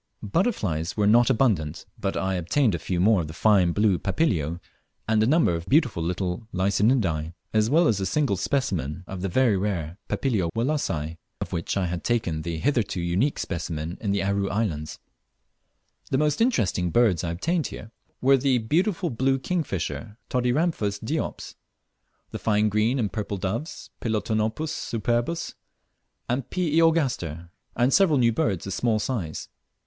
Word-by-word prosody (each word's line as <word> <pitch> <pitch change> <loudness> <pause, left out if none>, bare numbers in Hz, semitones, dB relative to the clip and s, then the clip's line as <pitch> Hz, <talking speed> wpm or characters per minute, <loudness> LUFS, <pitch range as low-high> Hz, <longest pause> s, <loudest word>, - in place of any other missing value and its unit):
Butterflies 100 - -1
were 105 - +2
not 120 +4 +5
abundant, 100 - +1
but 95 - -2
I 95 0 0
obtained 100 - +1
a 85 - -2
few 90 +3 -2
more 100 +1 +4
of 80 - -5
the 80 - -9
fine 95 -5 +4
blue 100 0 +2
Papilio, 90 - 0 0.5
and 110 0 +3
a 110 - +3
number 150 - +3
of 85 +1 -4
beautiful 130 - +3
little 90 +4 -2
Lycaenidae, 95 - +1 0.2
as 110 0 +3
well 160 +4 +4
as 105 -7 +2
a 95 - -1
single 145 -9 +1
specimen 95 - -1
of 95 0 -7
the 95 - -1
very 120 +2 +3
rare 95 -3 -2
Papilio 105 -11 0
Wallacei, 95 - -1 0.2
of - - -5
which 85 +3 -2
I 95 - +1
had 90 0 -3
taken 95 -10 0
the 85 0 -4
hitherto 115 - 0
unique 90 +11 0
specimen 85 -2 -4
in 105 - -2
the 100 0 +1
Aru 100 0 0
Islands. 85 -8 -2 1.1
The 130 - +1
most 150 +5 +1
interesting 100 - +1
birds 105 -4 +3
I 85 - -2
obtained 160 - -1
here, 110 - -9 0.3
were 135 +1 +5
the 130 -1 +2
beautiful 170 - 0
blue 135 +3 +1
kingfisher, 130 -8 -3
Todiramphus 125 - +1
diops; 150 +9 -4 0.8
the - - -5
fine 105 -1 +2
green 110 +5 +1
and 110 -6 -1
purple 105 -2 -3
doves, 110 - -4
Ptilonopus 110 +6 -1
superbus 120 +7 -2 0.7
and 125 +1 -2
P. 175 -5 -1
iogaster, 120 - +1 0.2
and 125 +3 +2
several 185 -7 +5
new 120 -2 +4
birds 100 -5 -1
of 95 - -4
small 115 +2 +1
size. 105 - -3
105 Hz, 160 wpm, -25 LUFS, 90-130 Hz, 1.1 s, not